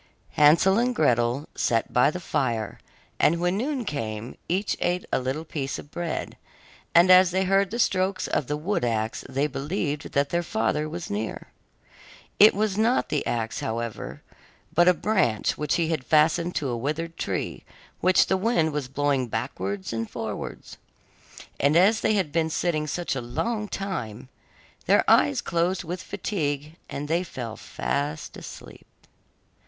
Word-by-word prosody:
Hansel 170 +7 +5
and 245 +1 +1
Gretel 120 - +2
sat 115 -1 0
by 125 +3 +5
the 180 - -4
fire, 115 - -2 0.4
and 170 +2 +3
when 175 +2 +1
noon 255 +3 -2
came, 110 - -4
each 190 +4 0
ate 180 +1 0
a - - +3
little 135 +5 -3
piece 140 -4 -3
of 145 - -11
bread, 170 -2 -4 0.6
and 175 +2 +7
as 185 0 +8
they 190 +1 +1
heard 195 0 +2
the 230 - -4
strokes 185 -4 +1
of 130 - -1
the 150 - -1
wood 175 +1 -1
axe 110 -2 -1
they 135 +2 0
believed 145 +2 -3
that 140 0 +2
their 175 - +1
father 150 +1 -1
was 170 +1 -6
near. 105 +2 -4 0.9
It 210 0 +8
was 210 -1 0
not 230 +3 +2
the 150 - 0
axe, 115 -1 -2
however, 115 0 -4 0.5
but 175 +2 +4
a 180 - +6
branch 185 - +1
which 150 -1 -1
he 165 -2 +1
had 155 -5 -1
fastened 160 +4 +3
to 140 - -1
a 120 - -1
withered 155 +7 -3
tree - - -3 0.4
which 185 +1 +4
the 190 - +1
wind 185 -7 +1
was 145 -3 -2
blowing 135 -1 0
backwards 100 -2 -3
and 115 -1 -3
forwards. - - -6 0.8
And 145 +4 +4
as 205 +5 +4
they 215 - +2
had 185 -7 0
been 160 0 +1
sitting 155 -2 -1
such 170 0 -2
a 135 - -2
long 210 - -2
time, 130 - -5 0.6
their - - +4
eyes 95 -1 +4
closed 170 +2 0
with 175 +2 -5
fatigue, 155 -7 -3
and 145 +1 -5
they 170 +4 +1
fell 120 -10 -6
fast 145 +6 -3
asleep. - - -11
155 Hz, 160 wpm, -25 LUFS, 130-185 Hz, 0.9 s, as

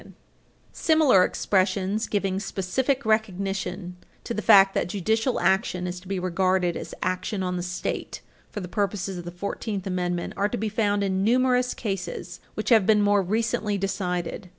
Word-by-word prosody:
[Footnote - - -16 0.6
13] - - -35
Similar 310 - +4
expressions, 195 +2 0
giving 195 -2 -1
specific 245 +8 -1
recognition 195 -4 -1 0.3
to - - -4
the 215 - -2
fact 195 -1 +7
that - - -1
judicial 220 +6 0
action 190 -2 +1
is 180 0 -4
to 185 - -16
be 195 0 -2
regarded 185 0 +1
as - - -6
action 185 +2 -2
of 180 0 -2
the 180 - -2
State 180 0 -4 0.3
for 205 - -6
the 180 - -6
purposes 195 -1 -2
of 175 - -8
the - - -4
Fourteenth 200 +2 -4
Amendment, 180 -2 -2
are 205 +1 +1
to - - -3
be 215 +2 -2
found 205 -1 +1
in 190 -1 0
numerous 250 +2 +2
cases 180 -4 -5 0.2
which 215 - -3
have 220 -5 +5
been 210 -1 +5
more 205 0 +4
recently 210 +1 -1
decided. 180 -2 -3
195 Hz, 175 wpm, -25 LUFS, 180-215 Hz, 0.6 s, fact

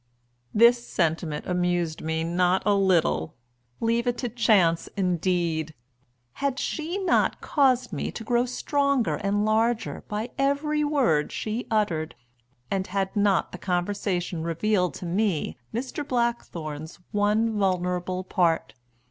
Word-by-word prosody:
This 235 +2 +5
sentiment 160 -3 -1
amused 175 -2 0
me 160 0 -1
not 180 +2 +2
a 205 - +4
little. 180 - +2 0.4
Leave 230 +1 +1
it 245 0 +1
to 245 - -2
chance 205 -8 +3
indeed! 170 -4 0 0.7
Had 280 -2 0
she 330 +7 -2
not 380 -3 +2
caused 265 -4 +2
me - - -2
to 225 - -6
grow 240 +2 +2
stronger 280 0 +1
and 205 +1 0
larger 225 +2 0
by 215 +3 -3
every 295 +2 +1
word 260 - +2
she 220 +3 -3
uttered? 175 -8 0 0.6
And 190 -1 -1
had 195 0 -2
not 200 -3 +2
the 180 - -8
conversation 180 -2 -1
revealed 180 +3 0
to 185 - -7
me 180 - -1
Mr. 260 +5 -3
Blackthorn's 170 - -2
one 210 +2 +2
vulnerable 180 -1 0
part? 170 -10 +1
200 Hz, 125 wpm, -26 LUFS, 175-235 Hz, 0.7 s, This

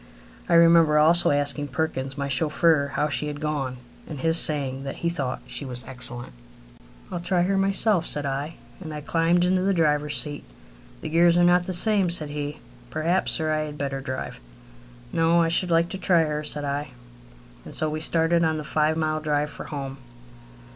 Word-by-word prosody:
I 170 - +4
remember 165 -2 +5
also 165 +3 +5
asking 145 0 0
Perkins, 135 -1 -3
my 140 0 -2
chauffeur, 150 +2 +2
how 150 - +1
she 150 +1 -2
had 145 -1 -5
gone, 145 -4 -3 0.3
and 150 -4 -7
his 165 +3 +3
saying 135 -3 0
that 135 0 -6
he - - +3
thought 135 -7 -3
she - - -6
was 125 -2 -6
excellent. 120 - -4 0.8
"I'll 175 - -3
try 175 0 +1
her 195 +2 0
myself," 195 -1 +1
said 145 -1 -2
I, 140 +4 -3 0.2
and 165 -4 -8
I 150 - -6
climbed 165 +3 +1
into 185 0 +1
the 195 +1 +1
driver's 150 -2 +1
seat. 145 -2 -5 0.6
"The - - -5
gears 170 +2 +4
are 175 - +4
not 175 0 +3
the 185 - -2
same," 200 0 +3
said 160 -3 +1
he. 145 0 -5 0.3
"Perhaps, 165 +4 0
sir, 155 -2 +1
I 155 - 0
had 150 -1 -8
better 135 -1 -3
drive." 130 - -6 0.7
"No; 165 +1 +3
I 165 - 0
should 175 +2 +1
like 170 0 +2
to 190 - -6
try 175 -3 +3
her," 150 -1 -3
said 150 -1 -4
I. 140 -1 -4 0.7
And - - -10
so 155 - 0
we 155 0 -3
started 165 +1 +2
on 160 -1 +1
the 155 - -5
five 155 +1 0
mile 155 -1 -1
drive 150 -1 -1
for - - -9
home. 135 -2 -6
155 Hz, 195 wpm, -24 LUFS, 145-170 Hz, 0.8 s, remember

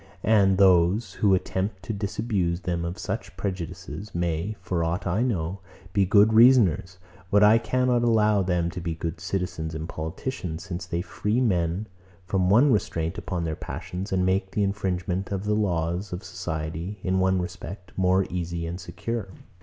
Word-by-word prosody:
And, 100 -3 +4
those, 95 +2 +4
who 100 -3 +5
attempt 95 +1 -2
to 110 - -3
disabuse 100 -3 -1
them 85 -1 -2
of 85 +2 -4
such - - -5
prejudices, 95 +2 -5
may, 85 +4 -1
for 90 -2 -1
aught 85 +3 -1
I 95 +6 +1
know, 95 -7 -1 0.3
be 100 -2 +3
good 105 +3 +5
reasoners, 110 -7 +5 0.3
but 105 +2 +5
I 110 +2 +7
cannot 125 0 +1
allow 110 -3 +3
them 90 -2 0
to 90 - -6
be 85 -1 -3
good 80 +2 -4
citizens 90 -4 -3
and 80 0 -4
politicians; 80 +1 -5
since 90 -1 -6
they 85 0 -2
free 105 +3 -1
men 90 -4 +1 0.4
from 90 0 +1
one 125 +8 +6
restraint 85 -5 -1
upon 90 -2 -3
their 80 -1 -2
passions, 95 +5 -6
and 95 -1 +2
make 95 +1 +1
the 105 - +1
infringement 95 -1 -2
of 100 0 -2
the 105 - +1
laws 90 -2 -1
of 90 +2 -5
society, 85 +2 -4
in 95 -1 +1
one 95 0 +2
respect, 95 +1 -7
more 95 0 +3
easy 85 -1 -3
and 85 +3 -5
secure. 115 -4 -4
95 Hz, 170 wpm, -26 LUFS, 85-105 Hz, 0.4 s, I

